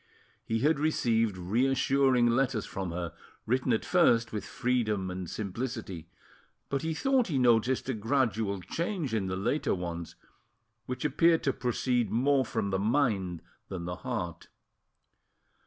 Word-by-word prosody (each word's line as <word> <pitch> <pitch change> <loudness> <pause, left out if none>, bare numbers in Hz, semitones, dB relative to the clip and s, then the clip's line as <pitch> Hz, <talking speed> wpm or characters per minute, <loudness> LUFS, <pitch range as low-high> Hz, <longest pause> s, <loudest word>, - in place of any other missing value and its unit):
He 115 0 -1
had 150 +1 +3
received 115 -9 +1
reassuring 130 +5 +2
letters 120 -2 +1
from 95 -2 -4
her, 85 -1 -4 0.3
written 125 +2 +1
at 110 - +1
first 120 -11 +3
with 105 - -3
freedom 110 -7 -1
and 90 -2 -5
simplicity; 105 -5 -5 0.6
but 140 -1 -1
he 160 0 -2
thought 265 - +2
he 150 -7 -1
noticed 125 +1 +3
a 130 - 0
gradual 110 -4 0
change 165 - -3
in 105 -4 0
the 95 - -2
later 100 +9 0
ones, 85 -2 -5 0.7
which 125 +2 -4
appeared 165 +2 +3
to 135 - +1
proceed 125 -2 0
more 135 +5 +3
from 100 -3 -2
the 95 - 0
mind 100 - 0 0.3
than 90 -3 -5
the 90 0 -4
heart. 110 -10 -4
115 Hz, 140 wpm, -29 LUFS, 95-135 Hz, 0.7 s, had